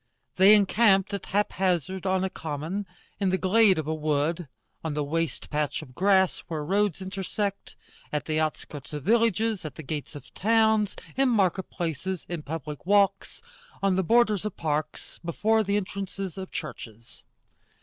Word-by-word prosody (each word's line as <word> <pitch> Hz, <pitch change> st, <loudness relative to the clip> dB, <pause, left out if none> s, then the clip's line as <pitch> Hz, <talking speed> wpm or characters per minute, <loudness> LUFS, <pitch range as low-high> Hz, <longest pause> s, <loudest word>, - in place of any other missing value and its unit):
They 195 Hz, +3 st, +8 dB
encamped 200 Hz, -1 st, +3 dB
at 200 Hz, -, -4 dB
haphazard 190 Hz, -2 st, 0 dB
on 185 Hz, 0 st, +1 dB
a 190 Hz, -, 0 dB
common, 160 Hz, +6 st, -4 dB, 0.3 s
in 195 Hz, -2 st, +1 dB
the 185 Hz, -, +2 dB
glade 195 Hz, +1 st, +4 dB
of 155 Hz, -, -2 dB
a 155 Hz, -, -1 dB
wood, 155 Hz, +2 st, -1 dB, 0.4 s
on 160 Hz, -2 st, -3 dB
the 150 Hz, -, 0 dB
waste 165 Hz, +3 st, -3 dB
patch 150 Hz, 0 st, -1 dB
of 130 Hz, -4 st, -14 dB
grass 190 Hz, +3 st, +3 dB
where 155 Hz, -3 st, -4 dB
roads 195 Hz, +1 st, +1 dB
intersect, 195 Hz, +1 st, -4 dB, 0.4 s
at 150 Hz, -, -2 dB
the 155 Hz, -1 st, 0 dB
outskirts 155 Hz, -2 st, -4 dB
of 150 Hz, -2 st, -5 dB
villages, 225 Hz, -1 st, +2 dB
at 150 Hz, -4 st, -7 dB
the 155 Hz, -, -8 dB
gates 150 Hz, +1 st, -5 dB
of 145 Hz, -, -11 dB
towns, 220 Hz, -1 st, +2 dB, 0.2 s
in 270 Hz, 0 st, +3 dB
market 195 Hz, -5 st, +1 dB
places, 170 Hz, +2 st, -3 dB
in 175 Hz, -3 st, -4 dB
public 150 Hz, -1 st, -6 dB
walks, 200 Hz, -, +2 dB, 0.4 s
on 195 Hz, -2 st, +3 dB
the 190 Hz, -, +2 dB
borders 215 Hz, 0 st, +3 dB
of 210 Hz, -3 st, -5 dB
parks, 155 Hz, -1 st, -3 dB
before 215 Hz, +6 st, +2 dB
the 200 Hz, 0 st, +1 dB
entrances 195 Hz, -2 st, -4 dB
of 190 Hz, -1 st, -6 dB
churches. 115 Hz, -6 st, -8 dB
185 Hz, 160 wpm, -27 LUFS, 155-200 Hz, 0.4 s, They